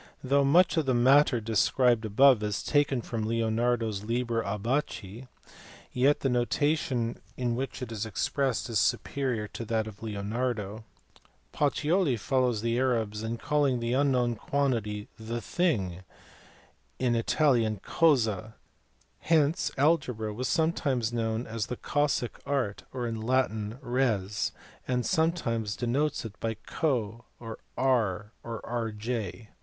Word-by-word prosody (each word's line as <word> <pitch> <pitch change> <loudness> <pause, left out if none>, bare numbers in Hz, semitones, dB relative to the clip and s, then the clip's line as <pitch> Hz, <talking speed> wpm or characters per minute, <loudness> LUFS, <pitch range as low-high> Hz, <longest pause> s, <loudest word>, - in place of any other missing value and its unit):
Though 140 +2 +3
much 170 +6 +4
of 155 -4 +1
the 130 - +3
matter 130 +1 +5
described 115 +2 +2
above 125 +3 +5
is 105 -2 -2
taken 140 -4 +1
from 110 -2 -3
Leonardo 115 +1 +1
s 100 -3 -4
Liber 115 +1 -1
Abaci, 115 +1 -3 0.6
yet 135 +4 +2
the - - +1
notation 125 0 0 0.2
in 120 -2 0
which 130 +1 -4
it 120 - -6
is 110 -2 -3
expressed 125 +5 -1
is 115 -5 +1
superior 125 -3 0
to - - -6
that 110 0 0
of 105 -2 -10
Leonardo. 110 0 -3 0.7
Pacioli 150 0 +1
follows 125 -2 0
the 115 +1 +1
Arabs 115 -5 0
in 115 +1 -3
calling 140 -2 +1
the 115 +1 -1
unknown 130 -3 +2
quantity 115 -5 -1
the 115 +2 -4
thing, 105 - -1 1.0
in 125 -2 +1
Italian 115 -3 +2
cosa 110 - +2 0.6
hence 160 -1 +2
algebra 130 -8 +1
was 130 +4 -3
sometimes 140 -8 0
known 115 0 -1
as 115 -2 -3
the 125 - -4
cossic 145 -4 -1
art 130 -8 -2
or 125 -2 -3
in 115 -1 -3
Latin 110 -3 0
res, 110 -6 0 0.4
and 125 -1 0
sometimes 115 - 0
denotes 130 +3 -1
it 100 -2 -9
by 115 0 -2
co 120 -6 -1
or 115 -2 -8 0.2
R 110 -6 +1
or 115 -1 -6
Rj. 110 -3 -3
120 Hz, 130 wpm, -28 LUFS, 110-135 Hz, 1.0 s, matter